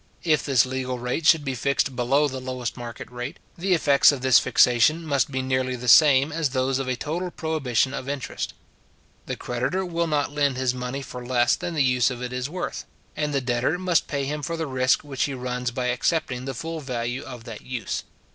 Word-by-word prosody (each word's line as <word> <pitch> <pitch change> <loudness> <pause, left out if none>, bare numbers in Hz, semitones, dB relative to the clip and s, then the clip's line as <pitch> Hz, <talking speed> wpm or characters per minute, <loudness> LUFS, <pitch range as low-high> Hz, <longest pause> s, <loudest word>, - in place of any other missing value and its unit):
If 155 -3 +2
this 130 -4 +3
legal 130 -1 -3
rate 125 +6 -2
should 160 -3 +5
be 135 - -1
fixed 140 +1 0
below 135 +5 +2
the 130 -2 -5
lowest 130 -2 -4
market 120 -2 -7
rate, 125 +6 -6 0.2
the 185 +1 +1
effects 145 -4 +5
of 140 -3 -4
this 130 -2 +6
fixation 140 +7 +3
must 140 -5 +1
be 130 -1 -2
nearly 130 -1 0
the 125 0 -7
same 140 +4 +6
as 160 -2 0
those 130 0 0
of 135 - -3
a 130 - 0
total 165 +8 -3
prohibition 140 -7 0
of 130 - -5
interest. 140 -3 -4 0.7
The - - -3
creditor 130 +11 -2
will 170 -1 -1
not 150 -2 0
lend 145 -3 +1
his 130 -1 +1
money 125 +2 -4
for 125 -2 -8
less 120 -1 +2
than 175 -1 -5
the 145 - +3
use 125 -2 +3
of 125 -2 -5
it 125 0 -5
is 125 +2 -3
worth, 180 +2 -4 0.3
and 150 -1 -1
the 140 -1 0
debtor 125 +6 0
must 180 -2 +1
pay 140 -2 -2
him 150 +2 -3
for 165 +3 -3
the 160 - -2
risk 130 -1 +1
which 140 -3 -1
he 140 - -4
runs 125 -1 -3
by 125 +1 -3
accepting 125 0 -1
the 135 -1 -4
full 165 +5 -5
value 125 -2 -3
of 125 -3 -9
that 115 -2 -8
use. 120 -6 -4
130 Hz, 215 wpm, -24 LUFS, 125-150 Hz, 0.7 s, this